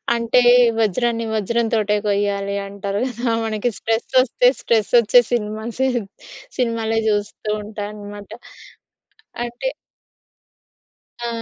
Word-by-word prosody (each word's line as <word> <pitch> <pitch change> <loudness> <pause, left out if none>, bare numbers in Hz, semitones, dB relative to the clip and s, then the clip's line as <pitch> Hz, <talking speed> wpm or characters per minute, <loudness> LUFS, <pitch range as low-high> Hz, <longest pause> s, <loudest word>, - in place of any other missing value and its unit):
అంటే 235 +2 +3 0.4
వజ్రాన్ని 230 +2 0
వజ్రం‌తోటే 220 0 0
కొయ్యాలంటారు 200 0 -2
గదా! 245 -1 -4 0.2
మనకి 220 +2 -1
స్ట్రెస్సొస్తే, 245 +2 +2
స్ట్రెస్సొచ్చే 235 +1 +4
సినిమాసే, 230 +3 -1 0.7
సినిమాలే 225 -2 0
చూస్తుంటానన్నమాట. 205 0 -4 1.2
అంటే 240 - -4 1.6
ఆ! - - -2
220 Hz, 70 wpm, -20 LUFS, 205-235 Hz, 1.6 s, స్ట్రెస్సొచ్చే